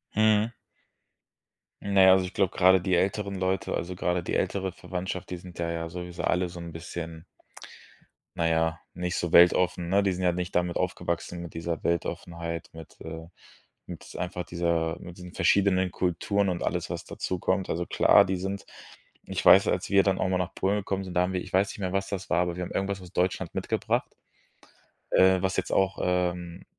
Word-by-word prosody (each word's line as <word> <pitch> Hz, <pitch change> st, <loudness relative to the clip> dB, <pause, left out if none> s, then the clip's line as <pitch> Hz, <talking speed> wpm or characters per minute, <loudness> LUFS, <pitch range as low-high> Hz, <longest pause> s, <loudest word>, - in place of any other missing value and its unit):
Mhm. 110 Hz, +1 st, +3 dB, 1.3 s
Na 100 Hz, -1 st, +3 dB
ja, 95 Hz, -, +8 dB
also 95 Hz, -1 st, +3 dB
ich 90 Hz, -, -8 dB
glaube 95 Hz, -2 st, 0 dB
grade 95 Hz, 0 st, +5 dB
die 95 Hz, 0 st, -1 dB
älteren 100 Hz, +2 st, 0 dB
Leute, 95 Hz, 0 st, -1 dB
also 90 Hz, +1 st, -3 dB
grade 90 Hz, 0 st, -1 dB
die -, -, -2 dB
ältere 95 Hz, -2 st, -1 dB
Verwandtschaft, 90 Hz, 0 st, -5 dB
die 90 Hz, -, -4 dB
sind 90 Hz, -1 st, -12 dB
da 85 Hz, 0 st, -1 dB
ja 85 Hz, 0 st, -4 dB
sowieso 90 Hz, 0 st, -6 dB
alle 90 Hz, 0 st, +1 dB
so 85 Hz, 0 st, -9 dB
'n 85 Hz, -1 st, -7 dB
bisschen 85 Hz, 0 st, -7 dB, 1.1 s
na 85 Hz, -1 st, +2 dB
ja, 80 Hz, 0 st, +1 dB, 0.2 s
nicht 90 Hz, 0 st, -2 dB
so 85 Hz, -1 st, -2 dB
weltoffen, 90 Hz, 0 st, +5 dB
ne? 100 Hz, +2 st, +4 dB
Die 100 Hz, -1 st, +1 dB
sind 90 Hz, +1 st, -3 dB
ja 90 Hz, -, +4 dB
nicht 90 Hz, +1 st, -4 dB
damit 90 Hz, 0 st, +1 dB
aufgewachsen 85 Hz, -1 st, -2 dB
mit 85 Hz, -, -9 dB
dieser 85 Hz, 0 st, -4 dB
Weltoffenheit, 85 Hz, 0 st, -3 dB
mit 80 Hz, -1 st, -12 dB
äh, 80 Hz, 0 st, -7 dB, 0.6 s
mit -, -, -9 dB
einfach 90 Hz, 0 st, -3 dB
dieser 85 Hz, -1 st, -1 dB
mit 90 Hz, -1 st, -10 dB
diesen 90 Hz, -1 st, -10 dB
verschiedenen 95 Hz, -2 st, +3 dB
Kulturen 95 Hz, +3 st, 0 dB
und 90 Hz, -, -3 dB
alles, 85 Hz, 0 st, -2 dB
was 85 Hz, -1 st, -4 dB
dazukommt. 95 Hz, +1 st, -2 dB
Also 85 Hz, +1 st, -2 dB
klar, -, -, +5 dB
die 95 Hz, 0 st, -1 dB
sind 95 Hz, +2 st, -4 dB, 0.6 s
ich -, -, -3 dB
weiß, -, -, +8 dB
als -, -, -1 dB
wir 100 Hz, 0 st, +5 dB
dann 95 Hz, -1 st, +1 dB
auch -, -, 0 dB
mal 90 Hz, -, +1 dB
nach 90 Hz, 0 st, -3 dB
Polen 100 Hz, +2 st, +1 dB
gekommen 95 Hz, -1 st, -3 dB
sind, 90 Hz, -, -7 dB
da 90 Hz, -, +3 dB
haben 90 Hz, +1 st, 0 dB
wir 90 Hz, -, -1 dB
ich -, -, -10 dB
weiß 95 Hz, +2 st, +3 dB
nicht -, -, -8 dB
mehr, 95 Hz, -2 st, -2 dB
was 95 Hz, 0 st, 0 dB
das 95 Hz, -2 st, -5 dB
war, 90 Hz, -, +2 dB
aber 90 Hz, -1 st, 0 dB
wir 90 Hz, -, -4 dB
haben -, -, -6 dB
irgendwas 95 Hz, 0 st, -2 dB
aus 90 Hz, -1 st, -12 dB
Deutschland 90 Hz, 0 st, -1 dB
mitgebracht, -, -, -1 dB, 1.0 s
äh, 95 Hz, 0 st, +5 dB
was 95 Hz, 0 st, 0 dB
jetzt -, -, -2 dB
auch, 95 Hz, 0 st, +2 dB
ähm, 90 Hz, -1 st, -1 dB
90 Hz, 200 wpm, -27 LUFS, 85-95 Hz, 1.3 s, ja